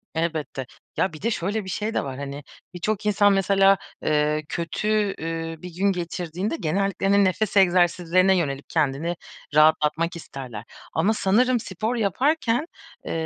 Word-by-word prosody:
Elbette. 160 -5 -2 0.3
Ya, 185 - +1
bir 155 - -10
de 230 - 0
şöyle 205 +2 -2
bir - - -7
şey 210 +4 -2
de - - 0
var, 135 -2 -6
hani, 140 +1 -6 0.3
birçok 200 +4 -2
insan, 205 -1 +4
mesela, 195 0 +4 0.3
eee, 150 0 +1
kötü, 170 +5 -3 0.3
ü 165 0 -4
bir 180 -2 -8
gün 200 +2 +2
geçirdiğinde 175 - -3
genellikle, 195 +4 0
hani, 200 0 +5
nefes 200 +2 0
egzersizlerine 180 0 +4
yönelip 140 -4 -2
kendini 160 +2 0 0.4
rahatlatmak 155 +2 +3
isterler. 130 -9 -8 0.3
Ama 190 +7 +2
sanırım 240 +5 +2
spor 220 +3 -3
yaparken, 245 - +1 0.4
eee, - - -4
180 Hz, 145 wpm, -24 LUFS, 160-200 Hz, 0.4 s, hani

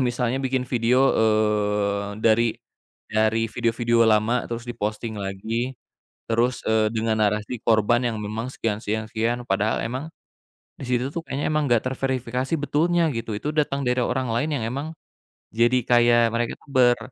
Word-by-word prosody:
Misalnya 125 +2 -1
bikin 130 -1 -1
video, 125 +2 +2
eee, 105 -2 +1
dari 115 +1 +4 0.6
dari 110 +1 +2
video-video 115 0 +2
lama 110 +3 +3
terus 115 0 -4
diposting 110 -1 -4
lagi 110 +6 -3 0.5
terus, 120 +2 +1
eee, 110 -1 +3
dengan 110 0 0
narasi 105 +3 -1
korban 115 +1 +3
yang 115 - -1
memang 110 +4 -4
sekian, 110 -5 -2
sekian, 110 +1 -2
sekian, 120 +2 -1
padahal 105 +3 +1
emang 130 +7 -4 0.7
di - - -5
situ, 125 +2 0
tuh, 170 - -2
kayaknya 140 +2 -2
emang 155 -1 +1
nggak 120 -1 +3
terverifikasi 130 +1 -2
betulnya, 165 +3 +1
gitu, 115 -1 -4
itu 145 - -3
datang 140 -2 0
dari 125 +1 +1
orang 130 +1 -1
lain 145 +7 0
yang 110 - -3
emang 140 +6 -4 0.7
jadi 120 +3 +3
kayak 120 -1 +5
mereka 120 0 0
itu - - -24
ber 125 -2 +4
115 Hz, 155 wpm, -24 LUFS, 110-130 Hz, 0.7 s, kayak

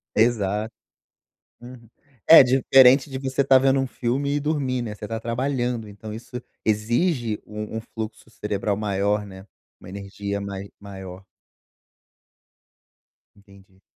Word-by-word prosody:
Exato, 110 -1 +1 0.9
uhum, 120 -2 -13 0.4
é 165 - +10
diferente 130 +1 +5
de 130 - -5
você 135 0 0
tá 135 -1 +6
vendo 135 +1 +3
um 135 - -2
filme 135 +4 -2
e 145 - +1
dormir, 140 -4 -1
né. 105 -3 -5
Você 105 - -8
tá 115 +1 -4
trabalhando, 120 -1 -2
então 105 +1 -9
isso 120 +2 -8 0.2
exige 115 - 0
um 105 +1 -6
um 110 - -4
fluxo 110 0 -8
cerebral 105 -2 -3
maior, 105 0 0
né, 95 0 -12 0.3
uma - - -12
energia 100 +1 -5
mai 100 0 -6
maior. 95 -2 -10 2.1
Entendi. 100 -1 -21
110 Hz, 130 wpm, -23 LUFS, 100-130 Hz, 2.1 s, é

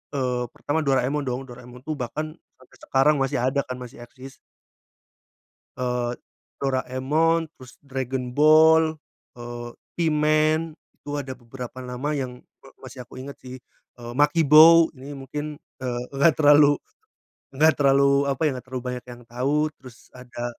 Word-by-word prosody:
eee, 125 -2 -1
pertama, 145 +2 -2
Doraemon 135 +2 +1
dong. 125 +2 -3
Doraemon 125 0 -12
tuh 155 +2 -4
bahkan 155 +6 -4 0.2
sampai 130 - -22
sekarang 135 +3 +2
masih 135 -2 0
ada, 130 +2 +1
kan, 130 - -5
masih 125 -1 -10
eksis. 130 +2 -13 1.4
Eee, 125 -1 -2 0.5
Doraemon, 140 +5 0
terus 130 -1 -14
Dragon 130 -2 -4
Ball, 155 +2 +5 0.4
eee, 120 0 -7 0.3
P-Man, 155 0 +1 0.2
itu 145 - -14
ada 135 -2 -5
beberapa 125 +1 -9
nama 125 +4 -4
yang 130 -3 -4 0.2
me - - -17
masih 125 - -10
aku 120 - -14
inget, 140 +2 -8
sih. 130 0 -9 0.4
Eee, 120 -1 -8
Makibao, 155 +3 +6
ini 140 +1 -10
mungkin, 145 +2 -6 0.2
eee, 120 -1 -3
nggak 140 +4 +4
terlalu 145 -1 +6 0.8
nggak 155 +2 +5
terlalu, 140 0 +3
apa 135 +1 -2
ya, 155 - +4
nggak 125 -1 -8
terlalu 130 -1 -5
banyak 125 -1 -6
yang 120 0 -11
tahu. 140 +6 -1
Terus 125 -3 -13 0.2
ada 125 -1 -9
135 Hz, 145 wpm, -24 LUFS, 125-150 Hz, 1.4 s, Makibao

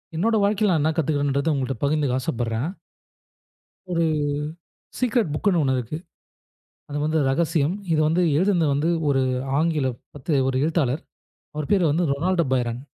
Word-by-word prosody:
என்னோட 220 +7 +1
வாழ்க்கையில 205 0 +2
நான் 160 -4 +2
என்ன 155 - +2
கத்துக்கிறேன்றத 145 0 +1
உங்கள்ட்ட 135 -1 -1
பகிர்ந்துக்க 140 -3 +1
ஆசைப்படுறேன். 120 +2 -2 1.2
ஒரு 170 -1 +1 1.0
சீக்ரெட் 240 -6 +1
புக்னு 175 +3 +1
ஒண்ணு 130 -1 +1
இருக்கு. 125 +5 -4 0.9
அது 145 - -4
வந்து 155 +1 +1
ரகசியம். 155 +3 +1 0.2
இது 155 - +3
வந்து 165 +3 +2 0.2
எழுதுனது 180 -4 +2
வந்து 145 +4 +1 0.2
ஒரு 135 -1 +2 0.4
ஆங்கில 155 -5 +1 0.3
பத்து 140 0 0
ஒரு 130 - -1
எழுத்தாளர். 155 -4 0 0.5
அவரு 150 -2 -3
பேரு 175 -6 +3
வந்து 165 0 +1
ரொனால்டோ 170 +3 +1
பைரான். 120 -1 -1
155 Hz, 140 wpm, -23 LUFS, 135-170 Hz, 1.2 s, இது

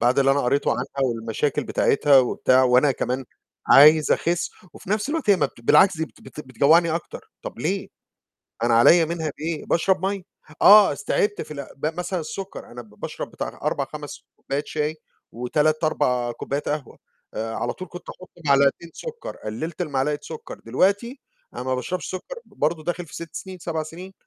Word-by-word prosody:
بعد 120 +3 +3
اللي 135 0 +4
أنا 140 +1 +2
قريته 140 +3 +1
عنها - - -1 0.2
والمشاكل 115 +3 -1
بتاعتها 140 0 +4
وبتاع، 130 0 +3
وأنا 130 +3 +4
كمان 130 +1 -3 0.4
عايز 150 +2 +7
أخس، 175 +1 0 0.2
وفي - - -11
نَفس 210 +4 0
الوقت 295 -7 0
هي 200 - +6
ما 155 - +2
بت - - -18
بالعكس 185 +10 +5
دي 160 - -1
بت 150 - -12
بتجوّعني 155 +5 +3
أكتر 170 - -7
طَب - - -8
ليه؟ - - -2 0.7
أنا 120 0 +3
عليّا 165 +9 +6
منها 160 -1 -3
بإيه؟ 160 0 -4
باشرب 190 +2 +1
مَيّه، 195 -1 -2 0.4
آه 210 0 +8
اس - - -8
تعِبت 205 0 0
في - - -12
ال 140 -2 -6
ب 140 - -3
مثلًا 180 0 -2
السكّر 190 +5 -7
أنا 120 +1 -9
ب 110 - -20
باشرب - - -5
بتاع - - -5
4، - - 0
5 - - -9
كوبايات 140 +2 -4
شاي 155 0 -2 0.4
و3، 150 +7 0
4 125 -5 0
كوبايات 140 +4 -4
قهوة 145 -4 -4 0.4
آآ، 110 +1 -3
على 120 - -2
طول 185 -2 -9
كنت 175 - -11
أحط 185 - -13 0.2
معلقتين 140 +4 +3
سكّر، 475 -1 -7
قللت 155 +11 -5
لمعلقة 145 -2 -1
سكّر، 160 - -9
دلوقتي 200 - 0 0.3
أنا - - -5
ما 130 0 -1
باشربش 180 +8 -4
سكّر 470 - -7
برضه 155 +1 -2
داخل 175 0 -3
في - - -14
6 170 -1 -8
سنين، 190 -1 -7
7 165 -2 -3
سنين، 175 +5 -10
155 Hz, 180 wpm, -23 LUFS, 130-180 Hz, 0.7 s, آه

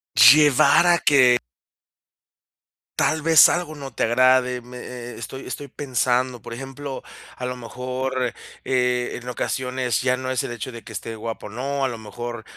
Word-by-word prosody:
llevar 145 +3 +6
a 175 - +5
que 125 -4 +5 1.6
tal 155 0 +1
vez 160 0 +7
algo 175 -3 -2
no 140 -2 -9
te - - 0
agrade. 125 +1 +3
Me 125 +1 -12
eh 125 -1 -8
eh - - -10
estoy 130 +3 -8
estoy 145 - -6
pensando, 125 -2 -1
por - - -10
ejemplo, 135 +1 -7 0.3
a 125 - -6
lo 125 0 -3
mejor, 125 +1 -3 0.3
eh, 125 -1 0
en 125 - -8
ocasiones 125 -1 -2
ya 125 0 +1
no 130 0 -4
es 130 - 0
el - - -5
hecho 120 +2 -6
de 115 -1 -10
que - - -11
esté 115 0 -6
guapa 115 +1 -6
o - - -7
no, 135 +4 -2
a - - +1
lo 115 -2 -7
mejor, 120 +1 -7
125 Hz, 175 wpm, -22 LUFS, 120-135 Hz, 1.6 s, vez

